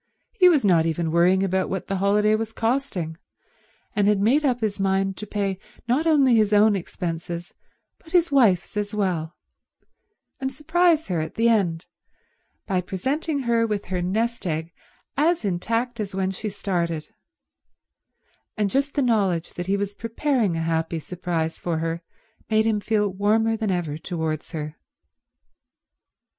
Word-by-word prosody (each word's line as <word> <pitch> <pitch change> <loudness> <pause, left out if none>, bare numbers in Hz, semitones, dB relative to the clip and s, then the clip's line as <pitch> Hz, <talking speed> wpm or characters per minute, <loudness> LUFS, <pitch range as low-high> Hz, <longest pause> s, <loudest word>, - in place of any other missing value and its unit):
He 375 -6 +6
was 295 -10 +3
not 165 -4 +4
even 165 0 -1
worrying 180 +3 +4
about 190 0 0
what 190 -1 -3
the 195 - -2
holiday 210 +2 +3
was 220 0 -1
costing, 225 - -1 0.8
and 205 -1 +3
had 210 -1 +3
made 250 +9 +3
up 250 -4 +1
his 210 -2 -1
mind 195 0 +1
to 210 - -6
pay 195 -2 -2 0.3
not 275 +7 +1
only 275 -6 +5
his 215 -1 +3
own 210 0 +5
expenses 170 -1 -5 0.5
but 320 - -17
his 345 -2 +3
wife's 220 -12 +3
as 210 0 -2
well, 175 -5 -1 1.0
and 265 0 -2
surprise 320 +3 +2
her 175 -3 0
at 155 0 -4
the 230 +1 +3
end 180 -7 +1 0.8
by 185 -3 0
presenting 275 - -2
her 235 -2 +2
with 210 -2 -2
her 180 - 0
nest 220 +4 -1
egg 160 +1 -3 0.4
as 320 -3 +2
intact 230 +6 -1
as 195 -3 -4
when 190 0 0
she 210 +3 -4
started; 170 -6 -2 1.5
and 205 -2 0
just 280 +1 0
the 285 - +2
knowledge 195 -8 +1
that 175 0 -5
he 200 +1 +2
was 200 0 -3
preparing 230 - 0
a 165 - -1
happy 165 0 -1
surprise 165 -1 -3
for 170 -2 -2
her 165 +1 -2 0.5
made 220 0 +3
him 220 -2 +2
feel 210 0 +1
warmer 215 +4 +1
than 220 -2 -2
ever 165 -5 -2
towards 160 -3 -3
her. 155 -1 -5
200 Hz, 155 wpm, -24 LUFS, 175-230 Hz, 1.5 s, He